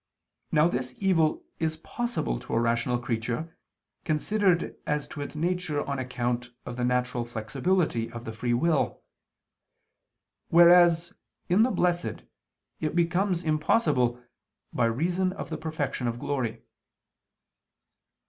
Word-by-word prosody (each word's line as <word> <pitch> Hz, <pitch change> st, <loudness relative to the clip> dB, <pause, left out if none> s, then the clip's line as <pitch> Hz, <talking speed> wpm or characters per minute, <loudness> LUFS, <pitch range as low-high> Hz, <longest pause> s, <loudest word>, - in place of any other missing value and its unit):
Now 155 Hz, +1 st, +5 dB
this 125 Hz, -5 st, -3 dB
evil 170 Hz, -6 st, +2 dB, 0.2 s
is 160 Hz, -1 st, -1 dB
possible 235 Hz, -, -3 dB
to -, -, -4 dB
a -, -, +3 dB
rational 120 Hz, +1 st, +1 dB
creature 120 Hz, +7 st, -3 dB, 0.5 s
considered 180 Hz, +3 st, +1 dB
as 150 Hz, -1 st, -1 dB
to 145 Hz, -, -7 dB
its 145 Hz, -, -6 dB
nature 170 Hz, -2 st, -1 dB
on 140 Hz, -1 st, -2 dB
account 125 Hz, -1 st, -2 dB, 0.2 s
of 120 Hz, -, -6 dB
the 125 Hz, -, -2 dB
natural 125 Hz, 0 st, 0 dB
flexibility 120 Hz, -, -1 dB
of 120 Hz, 0 st, -8 dB
the 110 Hz, -, -4 dB
free 120 Hz, +2 st, -1 dB
will; 155 Hz, +3 st, +1 dB, 1.5 s
whereas 175 Hz, +1 st, +6 dB, 0.4 s
in 185 Hz, +5 st, +4 dB
the 240 Hz, -, +4 dB
blessed, 175 Hz, -6 st, 0 dB, 0.6 s
it 155 Hz, +1 st, -2 dB
becomes 175 Hz, +1 st, +1 dB
impossible, 150 Hz, -, +2 dB, 0.5 s
by 120 Hz, -, +2 dB
reason 175 Hz, +10 st, 0 dB
of 190 Hz, -, -7 dB
the 160 Hz, -, -2 dB
perfection 155 Hz, -6 st, -2 dB
of 120 Hz, 0 st, -2 dB
glory. 130 Hz, -4 st, -3 dB
150 Hz, 125 wpm, -27 LUFS, 120-175 Hz, 1.5 s, whereas